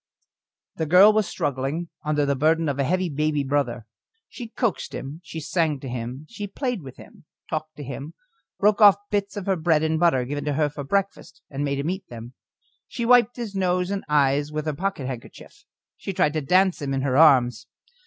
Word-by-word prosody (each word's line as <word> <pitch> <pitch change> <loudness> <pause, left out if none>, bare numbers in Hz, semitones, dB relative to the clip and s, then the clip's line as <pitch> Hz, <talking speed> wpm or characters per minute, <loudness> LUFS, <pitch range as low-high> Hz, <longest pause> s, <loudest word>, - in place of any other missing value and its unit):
The 160 - -2
girl 190 +6 +7
was 215 -3 +1
struggling 145 +5 -3
under 150 -1 +1
the 140 0 +1
burden 160 +4 +2
of 140 -1 -2
a - - +2
heavy 185 +6 0
baby 150 -1 -1
brother. 135 -5 -1 0.4
She 240 - -8
coaxed 230 -1 -2
him, 145 +5 -7
she 160 - -7
sang 155 -2 -1
to 135 - -8
him, 125 +3 -6
she 210 -3 -6
played 245 0 -3
with 130 -3 -11
him, - - -16 0.3
talked 155 -1 -4
to 145 - -8
him, 140 +4 -7 0.4
broke 210 +1 +2
off 205 -2 +9 0.2
bits 205 0 -1
of 200 - -4
her 195 - +1
bread 160 -2 +1
and 160 0 0
butter, 160 -8 +3
given 145 +2 -4
to 150 - 0
her 150 +1 +1
for 145 0 -7
breakfast, 195 +7 -3
and 140 +1 -3
made 140 -1 -1
him 145 +5 -1
eat 190 +1 -6
them; 120 +1 -9 0.5
she 235 - -4
wiped 245 -1 +5
his 235 -4 -6
nose 180 -1 0
and 200 -1 -3
eyes 145 0 +2
with 155 0 -3
her 155 - -1
pocket 185 -3 -3
handkerchief, 125 -3 -9 0.3
she 195 - -5
tried 150 -4 +1
to 155 - -1
dance 185 +4 +2
him 135 -1 -2
in 135 - -1
her 130 -2 0
arms. 125 -6 +4
155 Hz, 205 wpm, -24 LUFS, 140-185 Hz, 0.5 s, off